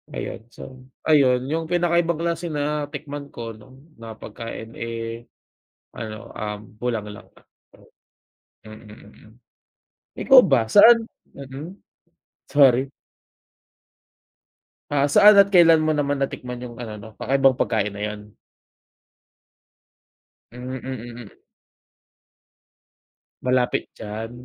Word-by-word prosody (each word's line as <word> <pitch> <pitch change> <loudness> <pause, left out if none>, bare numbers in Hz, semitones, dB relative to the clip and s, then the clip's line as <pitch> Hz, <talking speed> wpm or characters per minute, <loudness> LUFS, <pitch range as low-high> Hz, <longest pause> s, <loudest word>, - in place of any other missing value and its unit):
Ayun, - - -6
so, 130 +1 -12 0.2
ayun 130 -5 +3
yung 165 0 -1
pinakaibang 170 -1 +1
klase 170 0 -2
na 150 0 -2
tikman 145 -1 -7
ko 115 -1 -7
'no, 110 +5 -17 0.2
na 115 -1 -9
pagkain, 115 +1 -9
eh, 115 0 -6 0.7
ano, 110 -1 -8
um, 105 -1 -5 0.2
bulanglang 110 -4 -4
lang, - - -24 0.5
oo. - - -20 0.8
Mm, 110 0 -12
mm. 105 +1 -17 0.9
Ikaw 265 -2 +7
ba 125 -6 +2
saan 230 +2 +7 0.3
mm, 140 +3 -9 0.8
sorry. 135 -1 +4 2.0
Ah, 145 -1 +2
saan 205 +8 +7
at 200 0 +5
kailan 165 -3 +6
mo 155 - +2
naman 145 -1 -1
natikman 125 -2 -4
yung 120 - -10
ano 110 -2 -7
'no, 105 - -11
kakaibang 135 +1 +2
pagkain 105 -4 -1
na 100 - -6
yun? 105 0 -11 2.2
Hmm, 125 +1 -7
mm, 120 -2 -8
mm. - - -20 2.1
Malapit 125 -1 +1
diyan, 110 +2 -6
130 Hz, 110 wpm, -22 LUFS, 115-150 Hz, 2.2 s, Ikaw